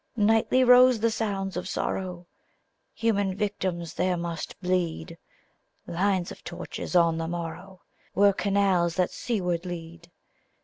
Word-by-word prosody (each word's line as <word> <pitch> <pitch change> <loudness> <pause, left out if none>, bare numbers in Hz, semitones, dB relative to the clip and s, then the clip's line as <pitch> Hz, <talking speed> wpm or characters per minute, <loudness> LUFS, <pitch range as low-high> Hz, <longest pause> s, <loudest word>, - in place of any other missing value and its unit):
Nightly 225 +4 +3
rose 250 -1 +7
the 230 +1 +2
sounds 195 -4 -2
of 180 +1 -4
sorrow, 180 -2 -3 0.7
Human 200 -4 0
victims 190 -5 -3
there 180 0 0
must 170 -2 -5
bleed: 180 - -1 0.7
Lines 185 0 0
of - - -11
torches, - - -6
on 165 -2 +4
the 165 - -2
morrow, 175 +2 -6 0.3
Were 200 +2 +5
canals 190 -4 +1
that 180 -1 +1
seaward 180 -7 -2
lead. 170 -1 -8
185 Hz, 125 wpm, -26 LUFS, 170-200 Hz, 0.7 s, rose